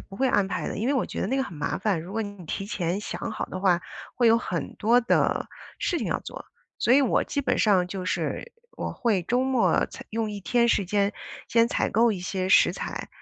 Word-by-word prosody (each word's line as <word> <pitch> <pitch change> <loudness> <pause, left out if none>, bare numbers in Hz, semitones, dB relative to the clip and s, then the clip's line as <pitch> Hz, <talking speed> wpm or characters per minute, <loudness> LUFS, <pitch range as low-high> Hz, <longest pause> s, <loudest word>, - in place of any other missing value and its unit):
不 195 - -12
会 265 +4 +2
安 205 -4 +2
排 195 - -3
的， - - -4
因 225 - -1
为 280 - +2
我 260 - +1
觉 - - -5
得 - - 0
那 260 +6 0
个 270 - +1
很 265 - -7
麻 150 - -2
烦。 195 -4 0
如 175 +4 -9
果 225 +1 -1
你 205 -3 -8
提 195 - -3
前 185 -2 -2
想 225 - -5
好 220 - -3
的 185 - -6
话， 180 -3 +3 0.3
会 245 - +2
有 230 - +5
很 180 -7 -4
多 235 +3 +4
的 235 - +1 0.3
事 350 - 0
情 - - -3
要 - - -1
做， - - -9 0.3
所 240 - +3
以 280 - +6
我 260 - +2
基 285 - -2
本 275 - 0
上 190 -5 +3
就 185 0 -5
是， 185 - -2 0.2
我 - - -3
会 215 -7 0
周 245 +8 +1
末 260 -3 +2
采 - - -11
用 220 -1 -2
一 205 -1 -6
天 235 +4 +2
时 205 - +2
间 200 +2 +1 0.4
先 230 0 +4
采 - - 0
购 230 +1 +4
一 190 - -5
些 185 +1 -2
食 - - +6
材， - - -5
210 Hz, 265 characters per minute, -26 LUFS, 190-240 Hz, 0.4 s, 以